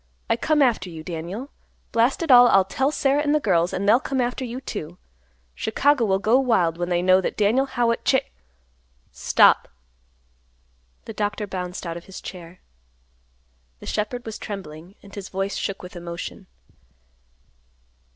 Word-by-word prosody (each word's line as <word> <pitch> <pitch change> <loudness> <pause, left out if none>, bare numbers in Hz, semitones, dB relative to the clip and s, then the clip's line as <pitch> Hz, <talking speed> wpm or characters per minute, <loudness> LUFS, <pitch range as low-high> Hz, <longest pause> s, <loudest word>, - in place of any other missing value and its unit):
I - - +4
come 300 +5 +2
after 220 -8 +1
you, 160 -2 -9
Daniel. 180 - -6 0.4
Blast 235 +8 +2
it 320 - +1
all, 245 -1 +9
I'll 195 -5 +4
tell 265 +8 0
Sarah 280 -1 +1
and 295 0 +1
the - - +3
girls, 180 - +1
and 200 +2 -2
they'll 225 +4 +6
come 270 0 -3
after 245 +1 -1
you, 245 0 -5
too. 175 -9 -7 0.6
Chicago 275 +3 +1
will 190 -2 +2
go 220 +6 +3
wild 180 -11 +1
when 175 0 -2
they 175 0 +1
know 185 +1 +5
that - - -3
Daniel 230 +6 +2
Howitt 240 -3 0
Cha—" 265 -1 +3 0.9
"Stop!" - - +4 1.4
The 225 - -7
doctor 210 0 -2
bounced 180 -2 -6
out 170 0 -4
of 170 - -11
his 190 - -9
chair. 180 -1 -10 1.2
The - - -12
shepherd 225 +4 -3
was 220 -1 -6
trembling, 180 -2 -8
and 200 0 -15
his 200 -2 -7
voice 195 +1 -3
shook 195 -1 -4
with 180 +1 -10
emotion. 170 +3 -7
205 Hz, 160 wpm, -23 LUFS, 180-245 Hz, 1.4 s, all